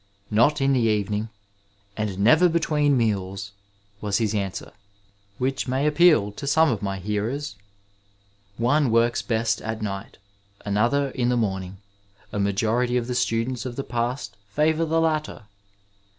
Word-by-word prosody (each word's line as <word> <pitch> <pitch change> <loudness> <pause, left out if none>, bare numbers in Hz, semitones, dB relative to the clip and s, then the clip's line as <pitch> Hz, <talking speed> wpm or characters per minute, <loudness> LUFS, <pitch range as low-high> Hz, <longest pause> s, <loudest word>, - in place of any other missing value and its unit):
Not 130 +8 +3
in 135 0 +3
the 130 - +3
evening, 105 -1 0 0.7
and 105 -3 -3
never 155 - +5
between 150 -4 +2
meals! 100 -3 -1 0.2
*' 100 0 -37
was 105 -2 0
his 110 -3 0
answer, 100 -3 -3 0.7
which 135 +1 -1
may 130 +3 0
appeal 150 - +4
to 140 +7 -7
some 160 +2 +4
of 110 - -2
my 100 -1 -2
hearers. 105 +6 -3 1.0
One 130 +4 +2
works 115 +1 +2
best 115 -1 0
at 110 0 -4
night; 100 -1 -5 0.5
another, 120 +8 +1
in 125 -2 0
the 125 - +2
morning; 95 -4 -2 0.6
a 105 - -2
majority 115 +5 +1
of 120 - -1
the 125 - -3
students 120 0 -1
of 125 -2 -5
the 135 - -3
past 120 -4 -3
favour 155 +7 +1
the 165 +1 +1
latter. 155 -6 -1
115 Hz, 150 wpm, -24 LUFS, 105-140 Hz, 1.0 s, never